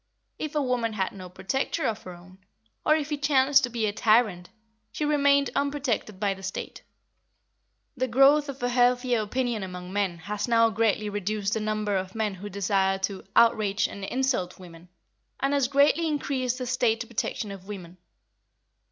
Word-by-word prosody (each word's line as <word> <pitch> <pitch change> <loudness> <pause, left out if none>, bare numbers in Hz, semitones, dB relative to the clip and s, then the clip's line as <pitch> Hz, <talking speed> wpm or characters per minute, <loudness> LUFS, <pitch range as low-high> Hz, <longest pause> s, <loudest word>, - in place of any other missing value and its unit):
If 310 -1 -4
a 300 - +2
woman 245 -3 0
had 190 -3 -1
no 185 -2 -10
"protector" 195 - -2
of 220 -1 -1
her 180 - -9
own, 185 +2 -16 0.4
or 310 - +4
if 305 -1 -3
he 295 - 0
chanced 275 -1 +4
to - - -7
be 230 -2 -1
a 205 - -1
tyrant, 215 -5 +2 0.4
she 300 - -2
remained 280 -1 +3
unprotected 275 -8 -1
by 200 -1 +1
the 190 - -12
State. 195 0 -6 1.1
The 255 -1 -1
growth 275 +4 +5
of 270 -2 -7
a 245 - +1
healthier 245 -1 +2
opinion 240 +1 -2
among 180 -1 -7
men 200 -4 0
has 205 +6 -4
now 230 -1 +4
greatly 215 -1 +1
reduced 205 0 -2
the 220 - 0
number 215 -1 -1
of 190 +1 -3
men 215 -2 -1
who 195 +2 -8
desire 195 -1 +1
to 195 0 -3
"outrage 215 -3 +3
and 200 - -9
insult" 245 -5 -1
women, 175 -1 -13 0.5
and 275 +1 0
has 280 -3 +2
greatly 285 +4 +3
increased 265 -4 -1
the 255 - -4
State 240 -2 +1
protection 215 -2 -3
of 195 -1 -10
women. 185 -4 -8
220 Hz, 175 wpm, -26 LUFS, 195-260 Hz, 1.1 s, growth